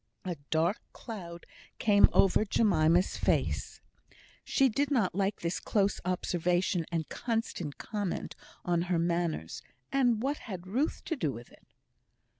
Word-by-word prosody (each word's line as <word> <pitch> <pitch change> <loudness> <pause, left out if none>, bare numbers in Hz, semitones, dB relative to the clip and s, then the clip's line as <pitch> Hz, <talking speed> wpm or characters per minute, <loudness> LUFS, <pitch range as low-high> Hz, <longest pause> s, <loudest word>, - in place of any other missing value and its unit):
A 180 -2 -2
dark 165 +6 +1
cloud 175 -7 -8 0.3
came 205 -2 +5
over 195 +2 +4
Jemima's 180 -5 +3
face. - - 0 0.6
She 270 - +3
did 275 +4 0
not 230 -10 +1
like 195 +2 -1
this 170 +1 -1
close 200 -2 0
observation 180 -1 0
and 165 -2 -1
constant 225 - -3
comment 205 -4 -4 0.3
upon 175 -1 +1
her 180 - +2
manners; 170 - -1 0.3
and 245 -5 +3
what 285 +2 0
had 185 -5 -7
Ruth 255 - -1
to 325 - -1
do 160 - -1
with 120 -1 -10
it? - - -21
185 Hz, 135 wpm, -30 LUFS, 170-220 Hz, 0.6 s, came